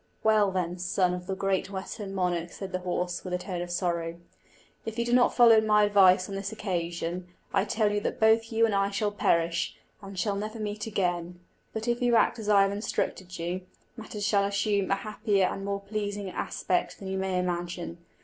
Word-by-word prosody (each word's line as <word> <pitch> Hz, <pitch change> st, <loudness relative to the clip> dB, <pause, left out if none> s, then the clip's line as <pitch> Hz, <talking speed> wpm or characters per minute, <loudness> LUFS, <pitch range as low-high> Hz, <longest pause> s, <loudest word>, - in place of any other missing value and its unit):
"Well, 215 Hz, -2 st, +4 dB
then, 180 Hz, -1 st, -2 dB
son 180 Hz, 0 st, +1 dB
of 180 Hz, 0 st, -6 dB
the 190 Hz, -, -2 dB
great 195 Hz, 0 st, 0 dB
western 195 Hz, +1 st, -6 dB
monarch," 175 Hz, -2 st, 0 dB
said 195 Hz, -2 st, -7 dB
the 185 Hz, -, -2 dB
horse, 180 Hz, 0 st, -2 dB
with 180 Hz, -1 st, -2 dB
a -, -, +1 dB
tone 180 Hz, -1 st, -4 dB
of 175 Hz, -, -5 dB
sorrow, 170 Hz, -1 st, -2 dB, 0.6 s
"if 225 Hz, 0 st, -6 dB
you 235 Hz, -, 0 dB
do 240 Hz, -, 0 dB
not 245 Hz, 0 st, +4 dB
follow 230 Hz, -3 st, +7 dB
my 210 Hz, -1 st, +4 dB
advice 190 Hz, -3 st, +5 dB
on 200 Hz, -, -7 dB
this 195 Hz, +1 st, -3 dB
occasion, 175 Hz, -3 st, -3 dB, 0.3 s
I 195 Hz, 0 st, +3 dB
tell 215 Hz, 0 st, +1 dB
you 205 Hz, -, +1 dB
that -, -, -3 dB
both 225 Hz, +1 st, +4 dB
you 225 Hz, 0 st, +4 dB
and 220 Hz, -, 0 dB
I 195 Hz, 0 st, +2 dB
shall 205 Hz, +1 st, -1 dB
perish, 170 Hz, -4 st, +1 dB, 0.3 s
and 195 Hz, -1 st, -9 dB
shall 200 Hz, +3 st, 0 dB
never 215 Hz, +3 st, -4 dB
meet 210 Hz, 0 st, -4 dB
again; 175 Hz, -4 st, -1 dB, 0.3 s
but, 220 Hz, +1 st, -4 dB
if 240 Hz, +1 st, 0 dB
you 240 Hz, -1 st, +3 dB
act 230 Hz, +1 st, +3 dB
as 215 Hz, -1 st, -4 dB
I 200 Hz, -1 st, +6 dB
have 195 Hz, -, +1 dB
instructed 190 Hz, -3 st, -3 dB
you, 175 Hz, +2 st, -3 dB, 0.3 s
matters 215 Hz, -3 st, -5 dB
shall 205 Hz, -2 st, +3 dB
assume 200 Hz, 0 st, 0 dB
a 195 Hz, -, +3 dB
happier 210 Hz, -1 st, 0 dB
and 195 Hz, +2 st, -3 dB
more 200 Hz, 0 st, -2 dB
pleasing 205 Hz, -1 st, -4 dB
aspect 180 Hz, -, -1 dB
than 195 Hz, -, -8 dB
you 190 Hz, 0 st, -2 dB
may 190 Hz, -1 st, -1 dB
imagine. 175 Hz, -1 st, -3 dB
195 Hz, 205 wpm, -28 LUFS, 180-210 Hz, 0.6 s, follow